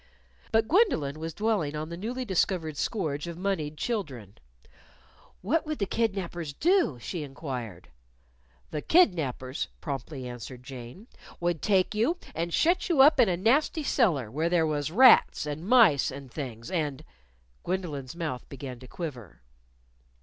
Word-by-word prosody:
But 225 -1 +3
Gwendolyn 160 - +2
was 165 +1 -4
dwelling 205 -9 0
on 155 +1 -4
the 170 - -5
newly 240 +8 -4
discovered 180 -5 0
scourge 155 -3 -2
of 170 -1 -6
moneyed 175 -6 -2
children. 135 - -4 1.1
"What 300 - +1
would 310 -1 -2
the 200 - 0
kidnapers 185 -8 -2
do?" 345 - +2
she 165 +7 -5
inquired. 130 - -6 0.8
"The 150 - -3
kidnapers," 150 - +2
promptly 135 -2 -5
answered 125 +1 -8
Jane, 130 - -10 0.3
"would 175 -2 -1
take 195 0 +2
you 235 +12 +1 0.2
and 170 +1 -2
shut 345 - +2
you 315 -6 +5
up 295 +1 +6
in 235 -5 +6
a 175 - 0
nasty 275 - +2
cellar, 165 - +1
where 160 +6 0
there 170 -2 +3
was 150 -1 -1
rats 250 -5 +6
and 150 +4 -5
mice 220 - +6
and 135 -1 -9
things 120 -6 -6
and 155 -4 -2 0.3
" - - -37
Gwendolyn's 165 -7 -4
mouth 155 -8 -4
began 130 -3 -7
to 130 - -12
quiver. 125 - -8
165 Hz, 150 wpm, -28 LUFS, 140-210 Hz, 1.1 s, up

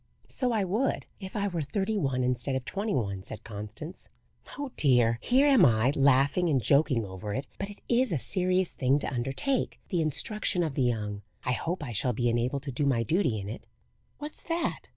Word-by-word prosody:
"So 255 -2 -1
I 220 -3 +1
would, 215 +9 0
if 190 -2 -8
I 205 -1 0
were 175 -4 -2
thirty 200 +8 -1
one 135 -9 0
instead 125 +2 0
of 130 -1 -3
twenty 200 +5 -2
one," 100 -5 -2
said 105 - -7
Constance. 110 - -8 0.5
"Oh 285 -2 -4
dear! 120 -5 +3
here 260 +4 +4
am 270 -9 +6
I, 120 -1 +4
laughing 140 +5 +3
and 140 -4 +3
joking 130 0 +3
over 95 +2 -5
it, 135 - -3
but 200 - -3
it 205 - -11
is 245 0 +2
a 165 - +1
serious 185 +4 +1
thing 135 +1 +2
to 145 - -3
undertake 135 - -1
the 175 -5 +1
instruction 180 - +1
of 155 -4 -2
the 135 - -1
young. 105 -5 -1 0.2
I 125 - 0
hope 165 +6 -2
I 130 - -5
shall 120 +3 +1
be 120 +2 +1
enabled 120 +4 0
to 140 - -4
do 140 +3 0
my 120 -4 +2
duty 155 - +1
in 100 - -6
it. 110 - -8 0.5
What's 295 +1 -8
that?" 335 0 -2
140 Hz, 205 wpm, -28 LUFS, 120-195 Hz, 0.5 s, am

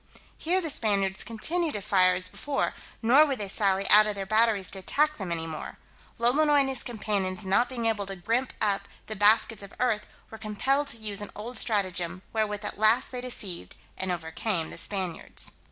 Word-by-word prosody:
Here 360 +4 0
the 325 -3 +1
Spaniards 195 -6 +1
continued 315 +9 -1
to 205 - -3
fire 185 -2 +4
as 185 0 0
before, 285 +6 -2 0.3
nor 260 +7 +7
would 280 -4 0
they 205 -2 -4
sally 195 -1 +2
out 210 +1 +8
of 210 - -2
their 195 -1 -4
batteries 215 -1 +2
to 195 - -3
attack 300 +10 +1
them 190 -4 -5
any 165 -1 -2
more. 160 -1 -7 0.4
Lolonois 290 +5 +4
and 270 - 0
his 265 -2 +1
companions 205 -4 -2
not 200 +6 +2
being 240 -3 -4
able 210 -3 0
to 195 - -4
grimp 230 +8 -1
up 200 -1 0 0.2
the 215 - -6
baskets 210 +1 +3
of 200 0 -11
earth, 235 -4 0 0.2
were 220 - -9
compelled 265 +7 0
to 230 - 0
use 210 -2 -1
an 205 - -6
old 230 +4 -6
stratagem, 185 -5 0
wherewith 210 -1 -1
at - - -5
last 220 +3 +3
they 250 -1 -5
deceived 195 - -4 0.2
and 190 -1 -2
overcame 165 +1 -2
the - - -2
Spaniards. 185 -5 -2
210 Hz, 195 wpm, -27 LUFS, 190-240 Hz, 0.4 s, out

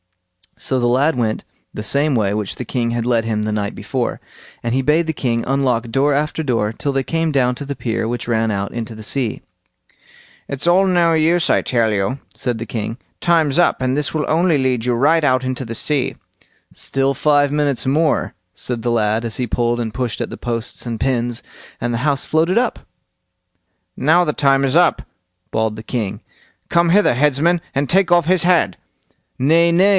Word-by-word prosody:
So 130 - -1
the 120 - +1
lad 135 +6 +2
went 115 -3 -1 0.3
the - - -5
same 140 +6 +1
way 105 -5 +1
which 105 -2 -3
the 125 - -6
king 115 0 -1
had 120 -1 -2
led 120 -2 +1
him 110 -2 -1
the 110 - -2
night 105 -1 -2
before, - - -3 0.4
and 115 0 -2
he 135 - +2
bade 155 +4 +2
the 160 - -1
king 115 -5 -1
unlock 125 -3 0
door 140 +5 +2
after 150 +3 -1
door 115 -6 0
till 140 +5 -2
they 135 -1 0
came 165 +2 -1
down 125 -3 +2
to 145 - -7
the 140 0 -4
pier 115 -3 -2
which 120 +1 -4
ran 115 -2 +1
out 100 -1 -2
into 115 -1 -5
the 110 0 -10
sea. 125 0 -2 1.1
"It's 140 +4 -4
all 185 +3 +5
no 175 -3 +3
use, 165 +2 +2
I - - +3
tell 115 -3 +1
you", 105 +7 -1 0.2
said 120 -2 -2
the 115 - -4
king; 110 +1 -4 0.2
"time's 160 -4 +2
up, 175 - +3
and 130 0 0
this 140 -3 0
will 155 -2 -1
only 165 0 +2
lead 130 -3 0
you 125 - +1
right 150 +7 +3
out 130 -2 +2
into 130 0 -3
the 115 0 -5
sea." 140 +2 0 0.6
"Still 135 0 -1
five 145 -1 +3
minutes 145 -3 0
more", 155 +3 +1 0.2
said 120 +3 -2
the 120 - 0
lad, 110 0 +1
as 115 - -4
he 125 - -2
pulled 120 +1 0
and 110 -2 -3
pushed 125 -4 -3
at - - -3
the - - -8
posts 115 0 -4
and 115 -2 -4
pins, 120 -2 -1 0.4
and 120 - -2
the 115 - -1
house 140 -2 +1
floated 165 +5 +1
up. 245 0 +1 1.2
"Now 160 +6 +3
the 150 -3 -1
time 135 -1 +3
is 135 - 0
up", 175 0 +3 0.5
bawled 110 -1 0
the 110 - -9
king; 105 -5 -3 0.5
"come 170 0 +3
hither, 205 -2 +4
headsman, 150 +5 +2
and 140 0 -1
take 190 0 +3
off 175 -2 +4
his 180 +1 +2
head." 170 - +2 0.6
"Nay, 165 +6 +4
nay!" 185 +4 +4
130 Hz, 200 wpm, -19 LUFS, 115-155 Hz, 1.2 s, all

